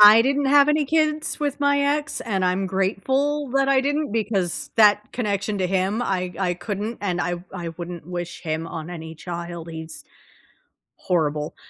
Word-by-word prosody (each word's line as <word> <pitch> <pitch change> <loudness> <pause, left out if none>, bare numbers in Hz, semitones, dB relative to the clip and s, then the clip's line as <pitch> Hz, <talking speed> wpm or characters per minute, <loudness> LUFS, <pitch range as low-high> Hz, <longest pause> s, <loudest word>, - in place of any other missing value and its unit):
I 210 +2 +10
didn't 275 +2 +1
have 285 +1 +6
any 300 0 +3
kids 310 +1 +1
with 290 -1 -2
my 285 0 +3 0.2
ex, 295 -1 -5
and 195 -5 -1
I'm 185 +1 +1
grateful 265 +10 0
that 275 +1 +2
I 270 -1 +5
didn't, 290 -1 0
because 205 -5 -1
that 210 -1 +5
connection 205 -3 -1
to 185 - +1
him, 195 +5 0
I 185 -4 -1
I 180 -2 +1
couldn't, 210 +4 -4
and 180 -3 -1
I 175 0 -2
I 175 -2 -4
wouldn't 170 -1 -7
wish 175 -1 -5
him 160 0 -2
on 165 +1 -6
any 160 -1 -7
child, 170 0 -6
he's 160 0 -8 0.9
horrible. 150 -4 -1
195 Hz, 170 wpm, -23 LUFS, 175-270 Hz, 0.9 s, I